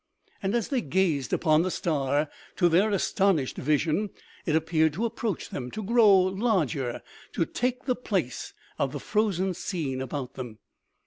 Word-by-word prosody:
And 195 +3 0
as 235 - 0
they 265 -4 +1
gazed 160 - 0
upon 155 0 +3
the 185 - 0
star, 150 -5 0 0.3
to 175 - +4
their 180 +6 +4
astonished 195 -7 +1
vision, 155 +7 +1 0.4
it 155 - +2
appeared 160 -1 +2
to 215 +9 -1
approach 225 -4 -3
them, 125 -2 -5
to 215 - -5
grow 220 -1 +6
larger, 185 - 0 0.3
to 165 - +1
take 250 +6 -2
the 250 -2 +1
place 185 - -3 0.2
of 135 0 0
the 145 - -3
frozen 195 0 0
scene 160 -7 -3
about 130 0 -4
them. 120 -4 -7
175 Hz, 155 wpm, -27 LUFS, 145-205 Hz, 0.4 s, grow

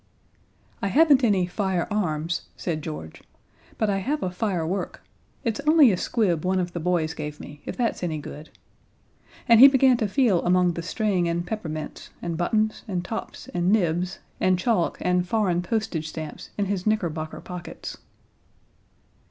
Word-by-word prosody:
"I - - 0
haven't 285 - +5
any 200 -6 +3
fire_arms_," 175 -4 -1
said 160 -3 -3
George, 150 - -7 0.6
"but 220 - +1
I 195 -1 +1
have 290 +10 -2
a 185 - 0
fire_work_. 180 -2 -2 0.5
It's 230 -2 -1
only 305 -6 +7
a - - +2
squib 180 -4 0
one 185 +1 +1
of 175 -1 -2
the 175 - -3
boys 165 -2 0
gave 150 -1 -6
me, 145 0 -10
if - - -5
that's 235 -2 0
any 165 -3 -2
good." 150 +1 -9 1.0
And 230 -2 +7
he 270 - +12
began 265 -2 +5
to 220 -3 0
feel 210 -5 +2
among 180 0 +3
the 170 - -4
string 185 0 0
and 170 +1 -1
peppermints, 160 -6 -5
and 170 -1 -3
buttons 215 +5 0
and 180 -3 -2
tops 225 - -6
and 175 +1 +1
nibs 180 -2 +1 0.2
and 185 -1 +3
chalk 195 -2 +1
and 180 0 +1
foreign 185 -4 +1
postage 180 -5 -2
stamps 155 -1 -7
in 205 - +1
his 195 0 -2
knickerbocker 165 -7 -1
pockets. 180 -1 -8
180 Hz, 160 wpm, -25 LUFS, 170-215 Hz, 1.0 s, he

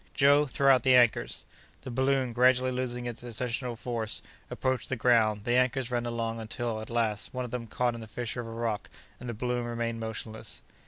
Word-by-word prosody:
Joe, 145 +1 +5
throw 135 0 +4
out 130 - +3
the 130 +1 +5
anchors!" 120 -2 +3 0.4
The 130 - -6
balloon, 130 0 +1
gradually 125 +1 +4
losing 125 -1 -2
its 120 -2 -4
ascensional 120 +1 -3
force, 115 -2 -2 0.3
approached 130 -2 -1
the 130 - 0
ground; 110 -3 +3
the 120 +2 +1
anchors 125 0 +1
ran 120 -1 0
along 115 -1 -2
until, 110 0 -3
at 110 - -8
last, 115 -1 -1
one 125 0 -2
of 120 - -8
them 120 -1 -4
caught 120 +2 0
in 115 - -7
the 110 - -8
fissure 120 +2 -4
of 115 - -8
a - - -7
rock, 115 -2 -2 0.3
and 125 - -7
the 120 - -4
balloon 125 +2 -1
remained 115 -1 -2
motionless. 110 0 -6
120 Hz, 205 wpm, -29 LUFS, 115-125 Hz, 0.4 s, Joe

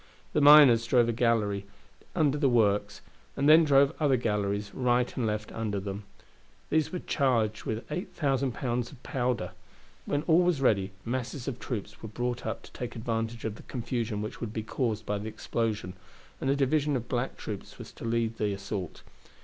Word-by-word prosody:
The 150 - +2
miners 140 -6 +8
drove 120 -1 +4
a - - +1
gallery 110 -4 +1 0.5
under 150 -5 +3
the 145 -2 +2
works, 105 -3 +2 0.4
and 140 - +2
then 160 +2 +8
drove 140 -2 +4
other 140 -4 +3
galleries 105 -3 -1
right 125 -1 +1
and 120 -3 0
left 105 0 -3
under 105 -3 -2
them. 100 +1 -6 0.7
These 155 -1 +2
were 185 - -2
charged 120 - 0
with 110 +1 -3
eight 180 +4 -3
thousand 135 -4 0
pounds 120 0 -2
of 130 -4 -15
powder. 125 -3 -1 0.6
When 145 +1 0
all 165 +1 +4
was 175 -5 +2
ready, 100 -7 +2
masses 125 +2 -3
of 125 -3 -3
troops 105 -5 -5
were 110 - -7
brought 120 +2 -3
up 110 - -4
to - - -14
take 125 - -6
advantage 115 0 -3
of 110 -1 -3
the - - -11
confusion 115 -4 -3
which 105 - -7
would 115 -3 -4
be 110 - -3
caused 110 -2 -2
by 105 0 -1
the 110 +2 -5
explosion, 110 -4 -2 0.5
and 135 - 0
a 140 - +3
division 145 +1 +1
of 120 -2 -3
black 125 +1 -2
troops 105 -3 -7
were - - -8
to - - -12
lead 115 -1 0
the 105 -2 0
assault. 100 -2 -5
115 Hz, 190 wpm, -29 LUFS, 105-135 Hz, 0.7 s, miners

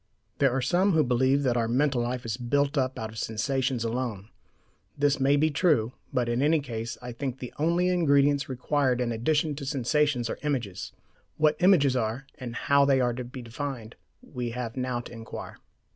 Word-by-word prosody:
There 140 - +5
are 130 +1 -1
some 180 +8 +2
who 160 -1 +4
believe 130 +3 +2
that 125 -3 +1
our 115 -1 +1
mental 130 +1 +1
life 120 +1 -3
is 110 -2 -2
built 140 +4 0
up 130 -2 0
out 110 0 -5
of 110 - -7
sensations 130 +2 -1
alone. 115 -3 -3 0.7
This 145 0 +2
may 135 +1 +4
be 155 +2 +2
true; 145 - +2 0.2
but 125 -3 0
in 120 +2 0
any 155 +3 +3
case 115 -4 -5
I 125 - -5
think 130 +1 -4
the 125 -2 -8
only 170 +3 +2
ingredients 145 -5 +3
required 130 0 0
in 120 -1 0
addition 145 +7 +1
to 145 - -6
sensations 140 -1 +1
are - - -5
images. 125 -11 -3 0.5
What 155 -1 +3
images 170 -8 +4
are, 120 +2 -2
and 120 -3 -6
how 140 +3 +3
they 140 -1 +3
are 125 -1 +1
to 125 +1 -5
be 125 +1 -9
defined, 120 -1 -6 0.3
we 125 - -5
have 120 -2 -4
now 125 -2 -2
to - - -12
inquire. 115 -1 -8
130 Hz, 190 wpm, -27 LUFS, 120-145 Hz, 0.7 s, There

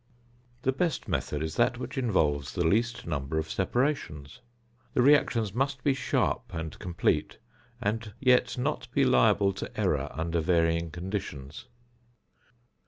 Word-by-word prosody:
The 130 - +3
best 160 +2 -1
method 75 +1 -2
is 80 0 -4
that 120 +1 +3
which 125 +1 -6
involves 75 - 0
the 85 - +1
least 115 +8 +1
number 70 +1 -2
of 80 0 -2
separations. 100 - -1 0.6
The - - +4
reactions 120 -7 +3
must 135 +1 -1
be 140 - +3
sharp 130 - -1
and 80 -1 -5
complete, 90 -2 0 0.4
and 110 +1 -2
yet 125 -1 +3
not 140 +5 -2
be 140 - +3
liable 105 -6 +4
to 100 - -7
error 75 -8 +1
under 85 +1 -1
varying 85 0 +2
conditions. 85 -5 -6
100 Hz, 135 wpm, -28 LUFS, 80-125 Hz, 0.6 s, The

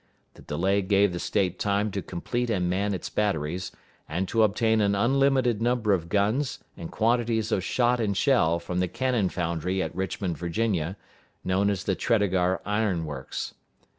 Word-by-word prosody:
The - - -16
delay 95 +6 0
gave 100 0 +3
the 85 - -3
State 90 0 0
time 100 +1 0
to 100 - -3
complete 120 +9 -3
and 90 -5 0
man 100 +3 0
its 90 - -5
batteries, 90 -3 -1 0.4
and 90 +5 -1
to 115 - +2
obtain 110 +1 +3
an 100 -1 +2
unlimited 130 0 +2
number 120 -3 +2
of 85 -3 -1
guns 105 +8 +1 0.2
and 85 - -7
quantities 115 -1 +1
of 95 - +1
shot 120 +3 +2
and 100 -4 0
shell 105 - +3
from 90 +1 -3
the 90 - +1
cannon 120 0 0
foundry 90 +2 -2
at 80 -3 -3
Richmond, 95 -3 -3
Virginia, 90 0 -1 0.5
known 95 +2 +1
as 100 -1 -1
the 100 - 0
Tredegar 95 -3 +1
Iron 105 -5 0
Works. 70 -3 -5
100 Hz, 165 wpm, -26 LUFS, 90-110 Hz, 0.5 s, gave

